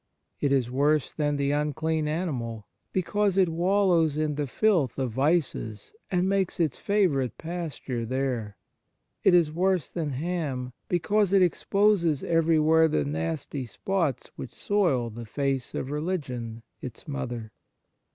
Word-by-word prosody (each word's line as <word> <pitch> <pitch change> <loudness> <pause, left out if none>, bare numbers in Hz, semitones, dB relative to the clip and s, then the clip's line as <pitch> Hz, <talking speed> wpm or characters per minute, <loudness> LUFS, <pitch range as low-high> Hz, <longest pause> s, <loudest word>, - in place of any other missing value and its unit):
It 140 - +1
is 130 -3 +2
worse 145 +2 +2
than 145 -1 0
the 140 0 0
unclean 150 +2 0
animal, 125 - -3 0.3
because 195 +1 +1
it 185 -3 +4
wallows 170 -3 +2
in 155 -1 0
the 145 0 -2
filth 170 - +2
of 130 -3 -1
vices 135 - 0 0.2
and 180 0 +1
makes 195 -2 0
its 160 -6 0
favourite 170 - +1
pasture 160 -8 -4
there. 120 -4 -2 0.7
It 190 - +6
is 165 -4 +4
worse 180 -1 +1
than 150 -6 -3
Cham, 145 -7 -3
because 200 +3 +1
it 195 -2 +6
exposes 180 -4 +2
everywhere 160 -1 +4
the 75 - 0
nasty 80 - -3
spots 165 - -1
w - - -38
r - - -3
hich - - -15
soil 150 - +1
the 115 +1 -8
face 135 0 -2
of 135 - -3
religion 130 -8 -3 0.2
its 125 +2 -8
mother." 120 -6 -4
150 Hz, 140 wpm, -27 LUFS, 130-175 Hz, 0.7 s, It